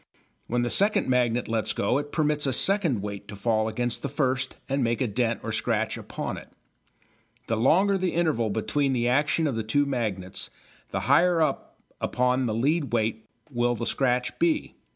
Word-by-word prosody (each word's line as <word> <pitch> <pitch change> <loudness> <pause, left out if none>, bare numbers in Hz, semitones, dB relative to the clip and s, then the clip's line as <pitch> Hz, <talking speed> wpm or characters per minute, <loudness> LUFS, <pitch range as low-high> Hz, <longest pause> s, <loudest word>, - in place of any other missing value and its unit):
When 120 +1 0
the 120 - 0
second 205 +2 +3
magnet 125 -2 +1
lets 115 -1 0
go 125 +7 +1
it 145 0 -6
permits 150 -2 +1
a 135 - +1
second 170 - +2
weight 100 -1 -6
to 100 - -8
fall 110 +1 +1
against 120 +2 -2
the 140 - -3
first 135 -2 -1
and 135 -1 0
make 115 0 0
a 130 - +1
dent 115 0 -1
or - - -3
scratch - - 0
upon - - -5
it. - - -11 1.0
The 115 - -1
longer 190 - +3
the 185 -2 -1
interval 155 -10 +1
between 135 +6 0
the 120 -1 +1
action 145 +5 +2
of 140 -6 0
the 115 - -1
two 145 +7 +1
magnets 105 -9 -3 0.4
the - - -2
higher 175 -1 +4
up 155 -4 -1 0.2
upon 125 +1 +1
the 110 - -1
lead 145 +4 0
weight 110 -1 -1 0.2
will 120 -1 +1
the 115 - -4
scratch 125 -1 0
be. 330 -3 +1
125 Hz, 185 wpm, -26 LUFS, 115-145 Hz, 1.0 s, higher